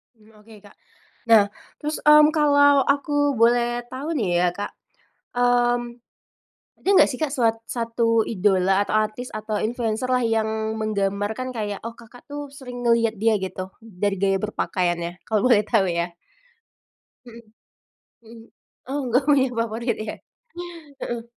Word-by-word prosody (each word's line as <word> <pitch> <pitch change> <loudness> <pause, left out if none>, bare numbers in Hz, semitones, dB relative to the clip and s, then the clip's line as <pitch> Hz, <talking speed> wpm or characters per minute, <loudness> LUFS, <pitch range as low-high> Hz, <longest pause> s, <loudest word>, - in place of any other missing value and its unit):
Mmm, 220 0 -23
oke, 225 +1 -16
Kak. - - -17 0.5
Nah, 220 -3 +7 0.3
terus, 300 +1 -3
mmm, 300 0 +7
kalau 285 -2 +5
aku 290 0 +1
boleh 240 +1 +2
tau 270 +4 -5
nih, 240 - -1
ya, - - +3
Kak. 205 0 -4 0.7
Mmm, 245 0 +1 0.8
ada - - -4 0.2
gak - - -2
sih, 250 - -5
Kak, 300 -3 -1
suat 230 -5 +1
1 230 -1 0
idola 195 -2 +2
atau 205 - -4
artis 215 +4 -3
atau 215 0 -4
influencer 230 +1 -2
lah, 250 0 +2
yang 220 -1 -1
menggambarkan 210 +3 -2
kayak, 205 -2 -3
oh, 230 - -6
Kakak 235 +1 -16
tuh, 290 -1 -7
sering 250 -3 -9
ngeliat 230 -1 +2
dia 220 +1 +2
gitu 185 0 -5
dari 205 -2 -2
gaya 195 -1 +2
berpakaiannya? 175 -4 -2
Kalau 215 -2 +1
boleh 240 -5 +5
tau, 215 -5 +2
ya. 170 0 -2 1.1
Mhm, 235 -1 -12 0.8
mhm. 225 0 -14 0.4
Oh, 275 +2 -2
nggak 250 +3 +2
punya 270 -3 +4
favorit, 230 +1 -1
iya. 215 - -5 0.9
Heeh. 235 -1 -4
230 Hz, 145 wpm, -23 LUFS, 210-250 Hz, 1.1 s, Nah